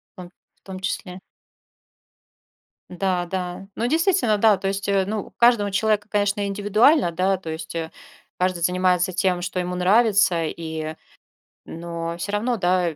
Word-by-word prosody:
В - - -69
том 180 -1 -10 0.2
в - - -42
том 190 -1 -8
числе. 185 -1 -4 1.7
Да, 180 -1 -1
да. 180 +1 -5
Ну, 235 - -1
действительно, 325 - +2
да, 210 0 +4
то 195 - -2
есть, 195 +1 -3
э, 195 -1 +2
ну, 215 +1 -2
у - - -23
каждого 235 -4 +3
человека, 210 +1 +1
конечно, 205 0 0
индивидуально, 210 - +3
да, 185 +3 +1
то 170 -3 -7
есть, 160 +1 -7
э, 160 -1 -3 0.5
каждый 180 -2 0
занимается 180 +1 +2
тем, 180 0 0
что 185 +1 -3
ему 180 0 -2
нравится, 195 -2 +3
и, 160 -1 -5 0.7
но 170 0 -5
всё 190 +4 -4
равно, 230 +4 0
да, 180 -3 +1
185 Hz, 160 wpm, -23 LUFS, 175-205 Hz, 1.7 s, да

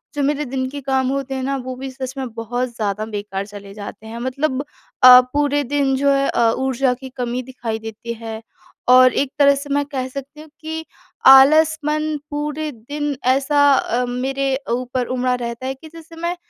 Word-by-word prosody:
जो 290 - -1
मेरे 295 +1 0
दिन 260 0 -2
के 285 +2 -6
काम 265 -1 0
होते 275 0 -2
हैं 260 - -3
ना, 275 +1 -1
वो 255 0 -6
भी 265 +1 -6
सच 260 0 -6
में 260 -2 -4
बहुत 245 +3 -3
ज़्यादा 210 -1 -2
बेकार 205 -2 -5
चले 200 -1 -11
जाते 205 +1 -9
हैं। 230 +1 -7
मतलब 260 +2 -2 0.4
अ, 250 0 +11
पूरे 290 0 +1
दिन 275 0 0
जो 280 +1 +2
है 275 0 +2
अ, 230 -1 +3
ऊर्जा 265 -1 +1
की 260 +1 -9
कमी 245 0 -2
दिखाई 240 -3 -5
देती 225 +1 -7
है 220 -1 -6 0.5
और 255 -1 +7
एक 275 -1 0
तरह 280 -1 +6
से 280 +1 -7
मैं 285 0 +1
कह 265 -3 -4
सकती 275 +3 -9
हूँ 310 - -14
कि 320 0 -5 0.4
आलस 305 +4 +7
मन 305 0 0
पूरे 300 +1 -3
दिन 285 +5 -4 0.2
ऐसा 285 +1 +3
अ, 250 -2 0
मेरे 265 +2 -1 0.2
ऊपर 250 +1 -1
उमड़ा 250 0 +1
रहता 235 +1 -5
है 265 - -2
कि 315 +4 -14
जैसे 330 0 -12
मैं 340 +1 -1
265 Hz, 195 wpm, -20 LUFS, 245-285 Hz, 0.5 s, अ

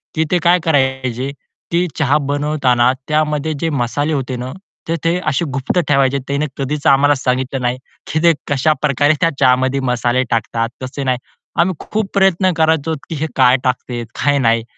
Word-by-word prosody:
की 160 - +2
ते 180 - +4
काय 175 +2 +4
करायचे 130 -3 0 0.4
की 175 +1 +1
चहा 145 0 +2
बनवताना 140 -4 +2 0.2
त्यामध्ये 150 0 0
जे 165 - 0
मसाले 145 +2 -1
होते 130 -3 -2
ना, 125 +1 -5 0.4
तर 165 - 0
ते 170 +2 +2
असे 155 +3 +1
गुप्त 135 +7 0
ठेवायचे 140 -1 +2
त्यांनी 140 +2 -1
कधीच 140 +1 -2
आम्हाला 140 +2 +5
सांगितलं 130 +1 -1
नाही, 125 0 0 0.4
की 155 - +1
ते 170 - +6 0.2
कशाप्रकारे 145 0 +2
त्या 165 - +4
चहामध्ये 130 +1 +3
मसाले 125 +1 +1
टाकतात. 115 0 -1
तसे 135 +2 -5
नाही. 130 -1 +1 0.4
आम्ही 180 +1 +2
खूप 215 -2 -3
प्रयत्न 190 -1 +3
करायचो, 160 0 +1
की 165 - -3
हे 155 +2 -2
काय 130 0 +5
टाकते, 125 -1 -2 0.2
काय 145 -1 +3
नाही. 115 -2 +2
140 Hz, 165 wpm, -17 LUFS, 130-155 Hz, 0.4 s, ते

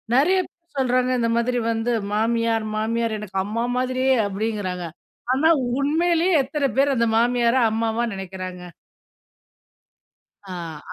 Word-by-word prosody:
நிறையா 365 +8 +4
பேர் 340 -2 -42
சொல்றாங்க 255 0 +2
இந்த 230 - +1
மாதிரி 245 +1 0
வந்து 225 +2 -1 0.2
"மாமியார், 225 0 +1
மாமியார் 225 0 -1
எனக்கு 195 -2 -6
அம்மா 225 +3 -2
மாதிரியே." 255 +1 +1
அப்டிங்கறாங்க. 195 -3 -3 0.5
ஆனா 310 +5 +3 0.3
உண்மையிலேயே 340 +4 +2
எத்தன 275 0 -1
பேர் 275 0 +3
அந்த 235 - +2
மாமியார 240 0 +2 0.2
அம்மாவா 225 +1 0
நினைக்குறாங்க? 185 -1 -7 1.9
ஆ 170 -4 -6
235 Hz, 115 wpm, -23 LUFS, 215-265 Hz, 1.9 s, நிறையா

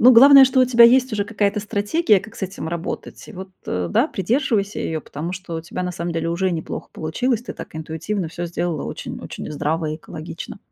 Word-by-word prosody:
Ну, 250 +2 +8
главное, 275 +3 +9
что 260 0 +3
у - - +7
тебя 235 -2 +6
есть 255 +1 +5
уже 205 -1 0
какая-то 205 -1 0
стратегия, 210 - +2
как 225 +3 -12
с - - -10
этим 190 -3 -4
работать. 170 0 -5
И - - -10
вот, 190 -1 -8 0.2
а, 90 -1 -2
да, - - +3
придерживайся 210 - 0
её, 160 -1 -2
потому 155 +4 -6
что 185 -2 -6
у 160 - -3
тебя 170 +2 -5
на 180 0 -3
самом 170 0 -4
деле 165 0 -2
уже 185 +2 0
неплохо 165 -2 -5
получилось. 235 +9 -1
Ты - - -6
так - - -10
интуитивно 160 +4 -3
всё 175 +2 -5
сделала 170 -2 -2
очень - - -6
очень - - -7
здраво 155 +2 -1
и 155 - -3
экологично. 160 +2 -8
190 Hz, 220 wpm, -21 LUFS, 165-225 Hz, 0.2 s, главное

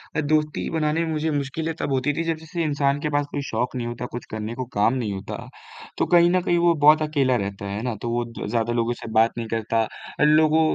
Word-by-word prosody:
अ, 155 - +2
दोस्ती 150 0 0
बनाने 160 +1 0
में 160 - -3
मुझे 155 0 -1
मुश्किलें 150 +3 -2
तब - - -2
होती 135 +2 +1
थी, 165 - -2
जब 165 -1 -1
जैसे 165 +1 -3
इंसान 145 -2 +1
के 150 - -1
पास 145 - +1
कोई - - -2
शौक 125 +3 -2
नहीं 120 -2 -2
होता, 120 +1 -5
कुछ 120 - -6
करने 110 +1 -4
को 130 - -4
काम 105 +4 +4
नहीं 115 -6 -2
होता, 95 +1 -6 0.6
तो - - +2
कहीं 170 0 +7
न 185 0 +3
कहीं 175 0 +1
वो 170 0 +4
बहुत 155 +1 +7
अकेला 140 -4 +2
रहता 100 -2 -3
है, 100 0 -4
है - - -3
ना? 125 - -1
तो 120 - -3
वो 120 +1 0
द 115 0 -7
ज़्यादा 115 0 0
लोगों 120 0 +1
से - - -7
बात 115 +1 +4
नहीं 115 -1 -3
करता 115 0 0 0.4
अ, - - +4
लोगों 155 +1 +5
140 Hz, 255 wpm, -24 LUFS, 115-155 Hz, 0.6 s, कहीं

